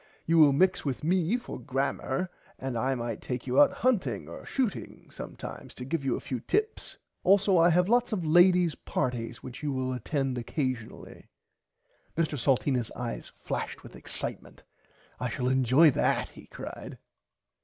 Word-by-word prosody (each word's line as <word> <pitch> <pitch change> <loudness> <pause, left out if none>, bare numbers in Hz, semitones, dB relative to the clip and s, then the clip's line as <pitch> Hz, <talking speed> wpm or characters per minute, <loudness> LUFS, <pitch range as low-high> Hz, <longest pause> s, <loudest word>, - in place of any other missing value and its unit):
You 165 0 +4
will 150 -2 +8
mix 180 +7 +3
with 140 0 -3
me 180 +6 +2
for 245 - -8
grammer 135 +5 -2 0.3
and 130 -2 -4
I 130 +4 0
might 120 -1 -4
take 125 -1 -4
you 130 +2 +4
out - - +6
hunting 145 - 0
or 85 - -9
shooting 250 -8 -3
sometimes - - -8
to 125 - -7
give 145 +2 -2
you 135 - +1
a - - -4
few 130 - -4
tips. 425 - -2 0.3
Also 195 -1 +5
I 170 +1 +6
have 180 +2 +3
lots 240 +2 +3
of 185 -6 -1
ladies 175 +1 +5
partys 120 -2 -3
which 130 +1 -8
you 150 -1 -1
will 130 -1 -1
attend 135 0 -2
occasionally. 130 -2 -4 0.9
Mr 160 -2 +1
Salteenas 125 -2 +1
eyes 120 -2 -5
flashed - - -5
with - - -12
excitement. - - -6 0.6
I - - -2
shall 125 -1 -1
enjoy 130 +4 +5
that - - +1
he - - -14
cried. - - -8
140 Hz, 160 wpm, -29 LUFS, 125-175 Hz, 0.9 s, will